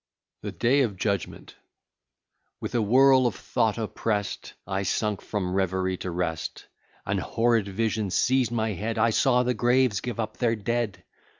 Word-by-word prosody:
THE -, -, -5 dB
DAY 135 Hz, +4 st, +2 dB
OF 110 Hz, -7 st, -1 dB
JUDGMENT 100 Hz, -1 st, -3 dB, 1.0 s
With -, -, -5 dB
a 120 Hz, -, +2 dB
whirl 130 Hz, +4 st, +5 dB
of 110 Hz, -, -3 dB
thought 115 Hz, -3 st, 0 dB
oppress'd, 105 Hz, -2 st, -3 dB
I 95 Hz, +1 st, -2 dB
sunk 105 Hz, +2 st, -1 dB
from 95 Hz, -4 st, -3 dB
reverie 95 Hz, -1 st, 0 dB
to 90 Hz, -, -5 dB
rest. 85 Hz, -2 st, -3 dB, 0.4 s
An -, -, 0 dB
horrid 115 Hz, -3 st, +1 dB
vision 110 Hz, +1 st, -1 dB
seized 125 Hz, +4 st, +2 dB
my 110 Hz, -2 st, 0 dB
head; 110 Hz, +5 st, -3 dB
I 115 Hz, +1 st, +3 dB
saw 125 Hz, +2 st, +3 dB
the 125 Hz, 0 st, +1 dB
graves 120 Hz, -2 st, +2 dB
give 120 Hz, -1 st, -5 dB
up 110 Hz, -, -3 dB
their 115 Hz, -2 st, +1 dB
dead! 115 Hz, -1 st, -2 dB
110 Hz, 160 wpm, -26 LUFS, 100-120 Hz, 1.0 s, whirl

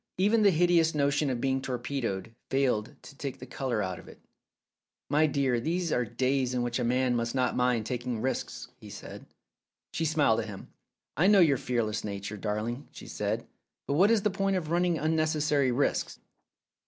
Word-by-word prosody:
Even 210 Hz, +4 st, +3 dB
ihe 205 Hz, -, +7 dB
hideous 165 Hz, -1 st, +3 dB
notion 145 Hz, 0 st, +1 dB
of 125 Hz, -2 st, -2 dB
being 135 Hz, +1 st, 0 dB
torpedoed 120 Hz, -5 st, -3 dB, 0.2 s
failed 130 Hz, -6 st, 0 dB
to -, -, -12 dB
take 140 Hz, -1 st, -5 dB
the 130 Hz, -, -9 dB
colour 125 Hz, -4 st, -2 dB
out 95 Hz, -1 st, -4 dB
of -, -, -14 dB
it. -, -, -14 dB, 0.9 s
"My 155 Hz, +1 st, +4 dB
dear, 135 Hz, -4 st, +1 dB
these 170 Hz, +6 st, -1 dB
are 125 Hz, -, +2 dB
days 130 Hz, +2 st, 0 dB
in 125 Hz, -, 0 dB
which 120 Hz, +1 st, -2 dB
a -, -, 0 dB
man 125 Hz, +1 st, +1 dB
must 115 Hz, +1 st, -1 dB
not 125 Hz, -1 st, +1 dB
mind 125 Hz, -3 st, +1 dB
taking 120 Hz, -1 st, -3 dB
risks," 130 Hz, +4 st, -3 dB
he -, -, -12 dB
said. -, -, -10 dB, 0.7 s
She 165 Hz, -, -1 dB
smiled 145 Hz, -8 st, +3 dB
at 110 Hz, -, -3 dB
him. 100 Hz, -3 st, -9 dB, 0.5 s
"I 170 Hz, +7 st, +3 dB
know 205 Hz, -1 st, +6 dB
your 150 Hz, -6 st, +5 dB
fearless 115 Hz, -4 st, -1 dB
nature, 100 Hz, 0 st, -5 dB
darling," 110 Hz, +6 st, -3 dB
she -, -, -11 dB
said; -, -, -3 dB, 0.4 s
"but -, -, 0 dB
what 185 Hz, +8 st, +5 dB
is 225 Hz, -3 st, +3 dB
the 210 Hz, -, +2 dB
point 195 Hz, 0 st, 0 dB
of 165 Hz, -4 st, -3 dB
running 175 Hz, -1 st, +2 dB
unnecessary 155 Hz, -3 st, +1 dB
risks?" 140 Hz, +4 st, 0 dB
130 Hz, 185 wpm, -29 LUFS, 120-155 Hz, 0.9 s, ihe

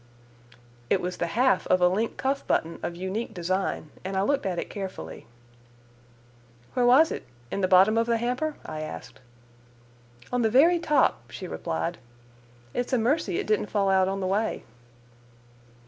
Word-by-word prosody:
It 195 Hz, -, +3 dB
was 180 Hz, 0 st, -4 dB
the 170 Hz, -, -1 dB
half 250 Hz, +9 st, +2 dB
of 185 Hz, -, +4 dB
a 180 Hz, -, +5 dB
link 210 Hz, +6 st, -1 dB
cuff 275 Hz, +1 st, -1 dB
button 165 Hz, +1 st, 0 dB
of 175 Hz, -, -4 dB
unique 190 Hz, +5 st, -4 dB
design, 180 Hz, -3 st, -2 dB
and 190 Hz, +1 st, -3 dB
I 190 Hz, -, +2 dB
looked 275 Hz, -2 st, +1 dB
at 180 Hz, -2 st, -2 dB
it -, -, -3 dB
carefully. 190 Hz, -, -7 dB, 1.5 s
"Where 245 Hz, -1 st, +2 dB
was 280 Hz, +6 st, +6 dB
it? -, -, -4 dB, 0.3 s
In 200 Hz, -, -2 dB
the 185 Hz, -, +2 dB
bottom 195 Hz, +4 st, +5 dB
of 230 Hz, -, +1 dB
the 235 Hz, -1 st, +2 dB
hamper?" 250 Hz, +6 st, -1 dB
I 155 Hz, -1 st, -5 dB
asked. 80 Hz, -, -8 dB, 1.1 s
"On 250 Hz, -, +2 dB
the 225 Hz, -, +3 dB
very 325 Hz, +9 st, +5 dB
top," 120 Hz, -, +1 dB
she 185 Hz, +7 st, -7 dB
replied. 170 Hz, 0 st, -3 dB, 0.7 s
"It's 245 Hz, +2 st, -2 dB
a -, -, +4 dB
mercy 230 Hz, -, +1 dB
it -, -, -2 dB
didn't 210 Hz, -1 st, +1 dB
fall 200 Hz, -2 st, +1 dB
out 190 Hz, -1 st, +4 dB
on 195 Hz, +1 st, -2 dB
the -, -, -1 dB
way." 205 Hz, +4 st, -1 dB
195 Hz, 170 wpm, -26 LUFS, 185-245 Hz, 1.5 s, was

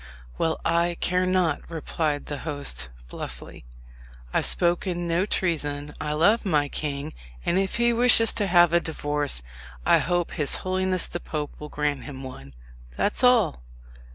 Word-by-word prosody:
"Well, 160 Hz, -1 st, 0 dB
I 170 Hz, +1 st, +1 dB
care 180 Hz, 0 st, +1 dB
not," 180 Hz, -5 st, +1 dB
replied 155 Hz, -2 st, -2 dB
the 145 Hz, -1 st, -5 dB
host 105 Hz, -, -1 dB, 0.2 s
bluffly. -, -, -9 dB, 0.7 s
"I've -, -, +3 dB
spoken 175 Hz, 0 st, +1 dB
no 170 Hz, +4 st, +1 dB
treason. 150 Hz, -6 st, -1 dB
I 150 Hz, -, -2 dB
love 200 Hz, +10 st, +3 dB
my 150 Hz, -8 st, +1 dB
king; 145 Hz, +1 st, -3 dB, 0.3 s
and 180 Hz, -, +2 dB
if 195 Hz, -1 st, -1 dB
he 235 Hz, 0 st, +3 dB
wishes 235 Hz, -1 st, +5 dB
to 205 Hz, -3 st, 0 dB
have 175 Hz, -2 st, +5 dB
a 170 Hz, -, +5 dB
divorce, 145 Hz, -, -1 dB, 0.4 s
I -, -, +5 dB
hope 175 Hz, +1 st, -1 dB
his 150 Hz, -4 st, +2 dB
holiness 185 Hz, -1 st, +1 dB
the 175 Hz, -, -5 dB
Pope 150 Hz, -3 st, -5 dB
will 150 Hz, -, -8 dB
grant 145 Hz, -3 st, -2 dB
him 135 Hz, -2 st, -8 dB
one, 70 Hz, -, -10 dB, 0.4 s
that's 210 Hz, -, 0 dB
all." 235 Hz, -, +4 dB
165 Hz, 155 wpm, -25 LUFS, 145-185 Hz, 0.7 s, wishes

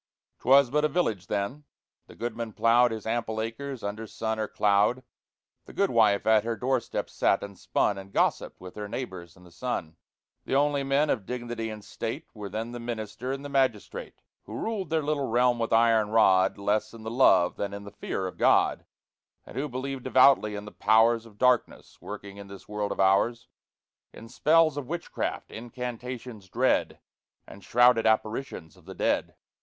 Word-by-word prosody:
'Twas 135 Hz, 0 st, +5 dB
but 150 Hz, +1 st, +2 dB
a -, -, +4 dB
village 150 Hz, -, -1 dB
then: 115 Hz, +9 st, -3 dB, 0.4 s
the -, -, -14 dB
goodman 115 Hz, -1 st, -5 dB
ploughed 120 Hz, +3 st, +4 dB
His 110 Hz, -2 st, -6 dB
ample 110 Hz, -1 st, -2 dB
acres 120 Hz, +3 st, -5 dB
under 105 Hz, +2 st, -4 dB
sun 110 Hz, +1 st, -3 dB
or 110 Hz, -, -1 dB
cloud; 105 Hz, +6 st, +2 dB, 0.6 s
The -, -, -13 dB
goodwife 115 Hz, -, +3 dB
at 110 Hz, -1 st, +4 dB
her 115 Hz, 0 st, -2 dB
doorstep 125 Hz, 0 st, -1 dB
sat 100 Hz, -, +1 dB
and 100 Hz, -1 st, -8 dB
spun, 100 Hz, +1 st, 0 dB
And 95 Hz, 0 st, -11 dB
gossiped -, -, 0 dB
with 90 Hz, 0 st, -10 dB
her 105 Hz, -1 st, -6 dB
neighbors 95 Hz, -7 st, -7 dB
in 90 Hz, -, -18 dB
the 90 Hz, -, -16 dB
sun; 85 Hz, -8 st, -4 dB, 0.5 s
The -, -, -2 dB
only 145 Hz, 0 st, +2 dB
men 140 Hz, +2 st, +2 dB
of 105 Hz, -7 st, -2 dB
dignity 120 Hz, -2 st, -4 dB
and 105 Hz, -1 st, -8 dB
state 125 Hz, +8 st, -5 dB
Were 105 Hz, -2 st, -7 dB
then 110 Hz, +4 st, -4 dB
the 120 Hz, -, -6 dB
Minister 115 Hz, +1 st, -5 dB
and 135 Hz, +1 st, -5 dB
the -, -, -5 dB
Magistrate, 130 Hz, -6 st, -2 dB, 0.2 s
Who -, -, -8 dB
ruled 210 Hz, -6 st, -3 dB
their 160 Hz, -1 st, 0 dB
little 145 Hz, -2 st, -1 dB
realm 120 Hz, +1 st, +2 dB
with 115 Hz, -, -2 dB
iron 115 Hz, -2 st, +4 dB
rod, 95 Hz, -4 st, +4 dB
Less 105 Hz, +2 st, -1 dB
in 110 Hz, -, -11 dB
the 110 Hz, -, -5 dB
love 95 Hz, -8 st, +4 dB
than 100 Hz, -1 st, -3 dB
in 100 Hz, 0 st, -7 dB
the 100 Hz, -, -10 dB
fear 100 Hz, -2 st, -4 dB
of 90 Hz, -, -7 dB
God; -, -, +3 dB, 0.6 s
And -, -, -13 dB
who 145 Hz, +3 st, -2 dB
believed 130 Hz, +1 st, -5 dB
devoutly 130 Hz, -5 st, +5 dB
in 105 Hz, 0 st, -6 dB
the 105 Hz, -, -9 dB
Powers 115 Hz, +2 st, +3 dB
Of 105 Hz, -2 st, -19 dB
Darkness, 125 Hz, +1 st, 0 dB
working 100 Hz, 0 st, -8 dB
in 100 Hz, -1 st, -10 dB
this 100 Hz, 0 st, -12 dB
world 105 Hz, -1 st, -3 dB
of -, -, -5 dB
ours, 100 Hz, +5 st, +2 dB, 0.6 s
In 115 Hz, -, -12 dB
spells 155 Hz, +3 st, +3 dB
of 140 Hz, -4 st, -4 dB
Witchcraft, 170 Hz, +2 st, -4 dB
incantations 120 Hz, -2 st, -7 dB
dread, -, -, +1 dB, 0.5 s
And 100 Hz, -, -13 dB
shrouded 120 Hz, -1 st, +4 dB
apparitions 110 Hz, -5 st, -1 dB
of 90 Hz, -3 st, -21 dB
the 95 Hz, +1 st, -9 dB
dead. -, -, 0 dB
115 Hz, 180 wpm, -27 LUFS, 105-130 Hz, 0.6 s, Twas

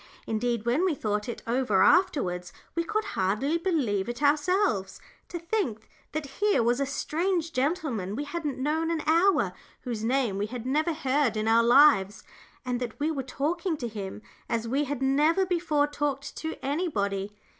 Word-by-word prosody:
Indeed, 230 Hz, 0 st, -1 dB
when 250 Hz, +9 st, +2 dB
we 365 Hz, -5 st, +2 dB
thought 210 Hz, -2 st, -2 dB
it 235 Hz, -, -6 dB
over 230 Hz, -5 st, +2 dB
afterwards 180 Hz, -, +2 dB, 0.2 s
we 335 Hz, -, 0 dB
could 430 Hz, +6 st, -1 dB
hardly 215 Hz, -, 0 dB
believe 250 Hz, -, 0 dB
it 240 Hz, +4 st, -5 dB
ourselves; 290 Hz, -, +1 dB, 0.3 s
to 350 Hz, -, -4 dB
think 335 Hz, -, -2 dB, 0.3 s
that 310 Hz, 0 st, -2 dB, 0.2 s
here 415 Hz, -, +3 dB
was 240 Hz, +2 st, +2 dB
a 275 Hz, -, 0 dB
strange 330 Hz, +4 st, -1 dB
gentleman 255 Hz, -, -1 dB
we 285 Hz, -, -2 dB
hadn't 295 Hz, -2 st, -4 dB
known 310 Hz, +5 st, 0 dB
an 330 Hz, -2 st, -1 dB
hour, 340 Hz, +5 st, +3 dB, 0.3 s
whose 235 Hz, -4 st, -4 dB
name 235 Hz, -4 st, +1 dB
we 205 Hz, -, -1 dB
had 240 Hz, +1 st, -7 dB
never 305 Hz, +6 st, +1 dB
heard 270 Hz, -6 st, +1 dB
in 215 Hz, +1 st, -1 dB
our 225 Hz, +1 st, +5 dB
lives, 235 Hz, -5 st, +5 dB, 0.4 s
and 250 Hz, -1 st, -1 dB
that 245 Hz, 0 st, -5 dB
we 305 Hz, +2 st, +1 dB
were 280 Hz, -4 st, -2 dB
talking 315 Hz, +6 st, -2 dB
to 245 Hz, -, -4 dB
him 210 Hz, -1 st, -7 dB, 0.3 s
as 230 Hz, 0 st, -1 dB
we 275 Hz, +5 st, 0 dB
had 275 Hz, -1 st, -3 dB
never 305 Hz, +8 st, +3 dB
before 335 Hz, -5 st, +1 dB
talked 290 Hz, -1 st, -3 dB
to 320 Hz, 0 st, -4 dB
anybody. 210 Hz, -, -1 dB
275 Hz, 170 wpm, -27 LUFS, 225-320 Hz, 0.4 s, our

